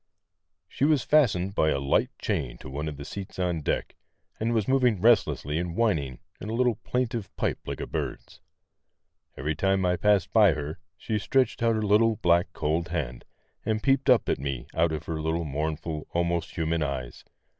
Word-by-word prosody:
She -, -, -4 dB
was 150 Hz, -3 st, +4 dB
fastened 100 Hz, -11 st, +3 dB
by 80 Hz, -5 st, +2 dB
a 75 Hz, -, +1 dB
light 70 Hz, -, +1 dB
chain 75 Hz, -, -2 dB
to -, -, -10 dB
one 75 Hz, +3 st, -3 dB
of 75 Hz, -2 st, -5 dB
the 70 Hz, -, -8 dB
seats 100 Hz, +3 st, -7 dB
on 90 Hz, -3 st, -1 dB
deck, -, -, -2 dB, 0.4 s
and 115 Hz, +2 st, 0 dB
was 110 Hz, -3 st, +1 dB
moving 125 Hz, -6 st, +3 dB
restlessly 90 Hz, -, +3 dB
and 85 Hz, -1 st, -3 dB
whining 80 Hz, -, 0 dB, 0.2 s
in 105 Hz, -, -6 dB
a 115 Hz, -, -2 dB
little 125 Hz, 0 st, +3 dB
plaintive 120 Hz, -4 st, -2 dB
pipe -, -, -1 dB
like -, -, -4 dB
a -, -, -3 dB
bird's. -, -, -5 dB, 1.0 s
Every 75 Hz, +5 st, -1 dB
time 95 Hz, +4 st, +1 dB
I 90 Hz, 0 st, +2 dB
passed 100 Hz, -3 st, +2 dB
by 105 Hz, -6 st, +6 dB
her 75 Hz, +3 st, -5 dB, 0.2 s
she 110 Hz, -2 st, -2 dB
stretched 130 Hz, +6 st, +1 dB
out 115 Hz, -1 st, +3 dB
her 110 Hz, -, -1 dB
little, 110 Hz, +2 st, +4 dB
black, 85 Hz, -2 st, +2 dB
cold 80 Hz, +1 st, -1 dB
hand, 75 Hz, -9 st, -4 dB, 0.4 s
and 110 Hz, -1 st, -1 dB
peeped 135 Hz, +1 st, +2 dB
up 125 Hz, -3 st, +5 dB
at -, -, 0 dB
me 70 Hz, -3 st, -4 dB
out 85 Hz, 0 st, +2 dB
of 75 Hz, -1 st, -4 dB
her 80 Hz, -1 st, -3 dB
little 80 Hz, +1 st, -1 dB
mournful, 75 Hz, +2 st, -3 dB
almost 85 Hz, -1 st, -1 dB
human 80 Hz, -1 st, 0 dB
eyes. 70 Hz, -4 st, -4 dB
85 Hz, 190 wpm, -27 LUFS, 75-110 Hz, 1.0 s, by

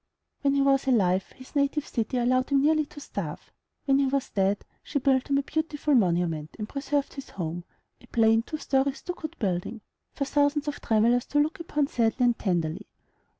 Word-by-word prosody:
When 280 Hz, -1 st, +2 dB
he 275 Hz, -, +3 dB
was 275 Hz, 0 st, +3 dB
alive, 195 Hz, -7 st, +2 dB
his 260 Hz, +3 st, -15 dB
native 285 Hz, +1 st, +1 dB
city 235 Hz, +2 st, -2 dB
allowed 255 Hz, +1 st, +2 dB
him 280 Hz, -1 st, +3 dB
nearly 305 Hz, 0 st, +3 dB
to 295 Hz, -, -11 dB
starve; 285 Hz, -, -6 dB, 0.3 s
when 275 Hz, -1 st, +3 dB
he 275 Hz, -, +3 dB
was 275 Hz, 0 st, -1 dB
dead, 195 Hz, +1 st, 0 dB, 0.2 s
she 295 Hz, -, -3 dB
built 260 Hz, -1 st, +2 dB
him 280 Hz, -, +3 dB
a 280 Hz, -, +1 dB
beautiful 300 Hz, 0 st, -1 dB
monument, 170 Hz, -, +1 dB
and 210 Hz, -, -4 dB
preserved 280 Hz, +1 st, -2 dB
his 275 Hz, -, -8 dB
home, 175 Hz, -1 st, -5 dB, 0.4 s
a 245 Hz, -, -17 dB
plain 225 Hz, -1 st, +4 dB
two 310 Hz, +6 st, -6 dB
story, 270 Hz, -2 st, +1 dB
stuccoed 340 Hz, +1 st, -7 dB
building, 195 Hz, +2 st, -2 dB, 0.3 s
for 275 Hz, -, -1 dB
thousands 290 Hz, +1 st, +1 dB
of 295 Hz, -, -4 dB
travellers 230 Hz, +2 st, +3 dB
to 290 Hz, -, +1 dB
look 305 Hz, +4 st, 0 dB
upon 300 Hz, -3 st, 0 dB
sadly 240 Hz, -1 st, +1 dB
and 240 Hz, -1 st, +2 dB
tenderly. 170 Hz, -4 st, -1 dB
265 Hz, 190 wpm, -27 LUFS, 220-285 Hz, 0.4 s, plain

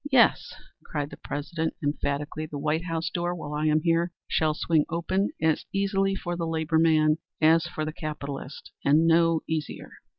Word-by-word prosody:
"'Yes,' 250 Hz, -4 st, +4 dB, 0.3 s
cried 145 Hz, -1 st, -4 dB
the -, -, -9 dB
President 160 Hz, +3 st, -3 dB
emphatically. 145 Hz, +1 st, -2 dB
'The 150 Hz, -, -6 dB
White 155 Hz, +4 st, -1 dB
House 165 Hz, -1 st, -2 dB
door, 175 Hz, 0 st, -1 dB
while 150 Hz, -3 st, -6 dB
I 150 Hz, +1 st, 0 dB
am 155 Hz, 0 st, +3 dB
here, 170 Hz, +1 st, +1 dB, 0.2 s
shall 155 Hz, -1 st, +1 dB
swing 160 Hz, -1 st, +2 dB
open 185 Hz, +4 st, 0 dB
as 160 Hz, -1 st, +1 dB
easily 195 Hz, 0 st, +1 dB
for 175 Hz, -2 st, -4 dB
the 170 Hz, -1 st, -2 dB
labor 160 Hz, 0 st, +1 dB
man 155 Hz, -1 st, +4 dB, 0.2 s
as 160 Hz, +2 st, +4 dB
for 155 Hz, -2 st, -4 dB
the 155 Hz, -, -4 dB
capitalist 145 Hz, -3 st, -6 dB
and 150 Hz, +4 st, +4 dB
no 165 Hz, 0 st, +4 dB
easier.'" 160 Hz, -2 st, -4 dB
160 Hz, 170 wpm, -26 LUFS, 150-170 Hz, 0.3 s, Yes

